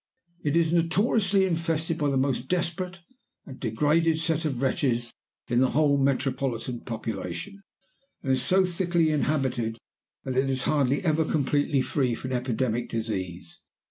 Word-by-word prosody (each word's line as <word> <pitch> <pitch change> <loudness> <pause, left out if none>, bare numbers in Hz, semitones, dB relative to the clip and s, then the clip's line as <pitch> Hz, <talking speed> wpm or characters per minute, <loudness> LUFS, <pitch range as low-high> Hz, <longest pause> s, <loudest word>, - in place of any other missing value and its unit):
It 145 +1 0
is 165 -1 +3
notoriously 195 +3 +2
infested 165 -2 -1
by 145 -1 +1
the 135 - +1
most 130 -1 0
desperate 180 +1 -2 0.4
and 135 -2 -10
degraded 150 +8 +2
set 160 0 0
of 135 -5 -1
wretches 120 -3 0 0.3
in 120 0 +2
the 130 0 +4
whole 145 -1 +3
metropolitan 135 -3 -1
population, 110 - -5 0.6
and 135 - 0
it 130 - +3
is - - -1
so 190 +1 +4
thickly 175 -2 +1
inhabited 130 -7 0 0.5
that 130 - -3
it 135 +1 +2
is 130 -1 0
hardly 140 -1 +1
ever 160 -2 +2
completely 145 -2 +1
free 125 -5 0
from 130 +3 -6
epidemic 120 -1 -1
disease. 95 -7 -4
140 Hz, 145 wpm, -26 LUFS, 125-165 Hz, 0.6 s, the